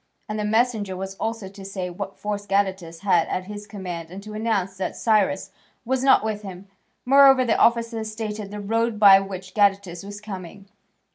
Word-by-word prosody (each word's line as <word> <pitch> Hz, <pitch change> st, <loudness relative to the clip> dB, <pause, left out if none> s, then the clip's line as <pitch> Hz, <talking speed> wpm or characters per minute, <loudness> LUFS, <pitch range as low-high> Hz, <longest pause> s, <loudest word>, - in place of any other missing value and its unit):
And 215 Hz, 0 st, -4 dB
the -, -, -1 dB
messenger 220 Hz, -3 st, 0 dB
was 190 Hz, +1 st, -5 dB
also 225 Hz, -3 st, -3 dB
to 195 Hz, +1 st, -12 dB
say 190 Hz, -2 st, -5 dB
what 195 Hz, +2 st, -7 dB
force 205 Hz, -1 st, -4 dB
Gadatas 190 Hz, -4 st, -1 dB
had 180 Hz, -5 st, +3 dB
at 185 Hz, -, -2 dB
his 210 Hz, +1 st, -8 dB
command 180 Hz, -5 st, -6 dB
and 190 Hz, +3 st, -9 dB
to 215 Hz, 0 st, -9 dB
announce 215 Hz, -4 st, -1 dB
that 190 Hz, -1 st, -3 dB
Cyrus 210 Hz, -4 st, +1 dB, 0.3 s
was 260 Hz, +2 st, 0 dB
not 270 Hz, -5 st, +5 dB
with 215 Hz, -1 st, -2 dB
him. 190 Hz, -2 st, -9 dB, 0.4 s
Moreover, 270 Hz, 0 st, +6 dB
the 230 Hz, -, +2 dB
officer 230 Hz, -1 st, +2 dB
stated 215 Hz, -1 st, -5 dB
the 210 Hz, +1 st, -7 dB
road 225 Hz, +2 st, 0 dB
by 195 Hz, -2 st, +9 dB
which 190 Hz, -1 st, -7 dB
Gadatas 195 Hz, -4 st, +1 dB
was 205 Hz, +1 st, -8 dB
coming. 195 Hz, -2 st, -9 dB
205 Hz, 185 wpm, -23 LUFS, 190-220 Hz, 0.4 s, by